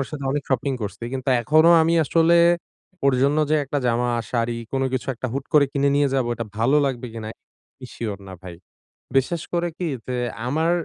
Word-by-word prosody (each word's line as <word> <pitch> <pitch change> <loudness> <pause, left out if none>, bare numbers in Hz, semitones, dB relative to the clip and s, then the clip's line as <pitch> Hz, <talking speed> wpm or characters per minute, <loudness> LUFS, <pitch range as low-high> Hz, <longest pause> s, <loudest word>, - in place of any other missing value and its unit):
ওর 135 - -2
সাথে 145 -3 -6
অনেক 145 -1 -1
শপিং 130 +1 0
করছি। 100 +2 -6
কিন্তু 130 0 -4
এখনো 155 +5 +4
আমি 165 +1 +2
আসলে 165 +4 +3 0.7
ওর 135 -2 +4
জন্য 140 +2 +2
যে 155 - +4
একটা 145 +2 -2
জামা, 120 +1 +1 0.2
শাড়ি 115 -1 -1 0.2
কোন 135 0 0
কিছু 130 - -2
একটা 130 - -5
হুট 135 0 -3
করে 150 -2 +6
কিনে 140 0 +1
নিয়ে 145 -1 +3
যাব। 130 -3 +1
এটা 115 - -4
ভালো 130 +6 +3
লাগবে 125 -2 -3
কিনা? 110 -1 -6 0.5
আমি 130 - -10
সিওর 105 -4 -4
না - - -8
ভাই। 90 -2 -8 0.6
বিশেষ 160 +5 0
করে 175 0 +1
কি? 175 - -2 0.2
যে 125 - -2 0.3
আমার 160 +6 +1
135 Hz, 200 wpm, -22 LUFS, 120-150 Hz, 0.7 s, করে